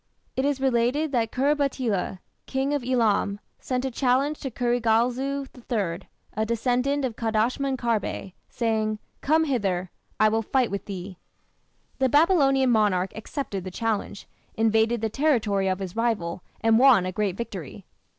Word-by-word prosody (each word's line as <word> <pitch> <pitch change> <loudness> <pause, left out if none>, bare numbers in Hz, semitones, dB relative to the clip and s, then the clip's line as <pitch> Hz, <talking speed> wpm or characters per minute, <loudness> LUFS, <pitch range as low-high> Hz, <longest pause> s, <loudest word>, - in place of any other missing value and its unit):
It 265 - 0
is 285 -2 0
related 265 +4 +1
that 230 -4 0
Khur 280 +3 +2
batila, 255 -10 -1 0.3
King 270 +2 -1
of 285 -3 -1
Elam, 220 -5 +1 0.2
sent 255 0 -2
a 265 - -2
challenge 270 +4 +1
to 270 - -4
Kurigalzu 245 +3 +1 0.2
III, 195 -7 -2 0.2
a 215 - 0
descendant 250 +5 0
of 240 -4 -3
Kadashman 235 +5 0
Kharbe, 225 -5 -2 0.2
saying: 220 -2 0 0.2
"Come 315 +3 +3
hither; 195 - -1 0.3
I 215 - +6
will 220 +1 +1
fight 250 +1 +1
with 200 - -4
thee". 185 -2 -7 0.8
The 265 -1 +3
Babylonian 275 -4 +4
monarch 200 -4 +2
accepted 220 - -5
the 185 - -5
challenge, 210 0 -3 0.3
invaded 225 +1 +2
the 220 - 0
territory 220 -8 +1
of 185 0 +1
his 190 -1 -6
rival, 210 -7 -1 0.2
and 225 0 +4
won 250 -8 +6
a 185 - -2
great 195 -1 -1
victory. 235 - -7
235 Hz, 150 wpm, -25 LUFS, 210-265 Hz, 0.8 s, I